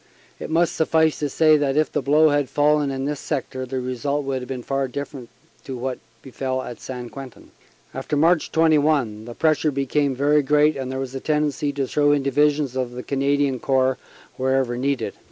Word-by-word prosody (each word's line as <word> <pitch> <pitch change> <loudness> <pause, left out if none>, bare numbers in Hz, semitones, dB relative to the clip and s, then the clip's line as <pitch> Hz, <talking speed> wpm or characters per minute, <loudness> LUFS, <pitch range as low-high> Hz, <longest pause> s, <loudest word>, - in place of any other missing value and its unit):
It - - -6
must 165 +1 +1
suffice 160 -1 +2
to 145 - -1
say 155 +1 +4
that 145 -1 0
if 155 - +2
the - - -1
blow 150 +4 +4
had 145 -2 +1
fallen 150 0 +2
in 135 0 -3
this 145 0 -3
sector 130 -3 -4
the 130 +1 -3
result 135 +3 -2
would 135 -1 -2
have 125 - -9
been 130 -2 -5
far 135 +1 -1
different 135 -1 -7 0.4
to 130 -2 -5
what 125 +1 -4 0.2
befell 130 0 -3
at 120 - -9
St. 125 -2 -7
Quentin. 135 -3 -11 0.4
After 135 +3 -3
March 165 +2 +2
21 150 -9 +2
the 120 0 -9
pressure 155 -1 +2
became 140 0 0
very 145 +3 +3
great 150 +2 +3
and 130 -1 -4
there 130 - -4
was 135 -1 -4
a 135 - -4
tendency 150 0 0
to 140 -1 -1
throw 145 +2 +2
in 145 -2 +1
Divisions 145 0 +1
of 125 -2 -2
the 125 0 -6
Canadian 140 -1 0
Corps 130 0 +1 0.4
wherever 130 -1 0
needed. 125 -4 -1
140 Hz, 195 wpm, -22 LUFS, 130-150 Hz, 0.4 s, say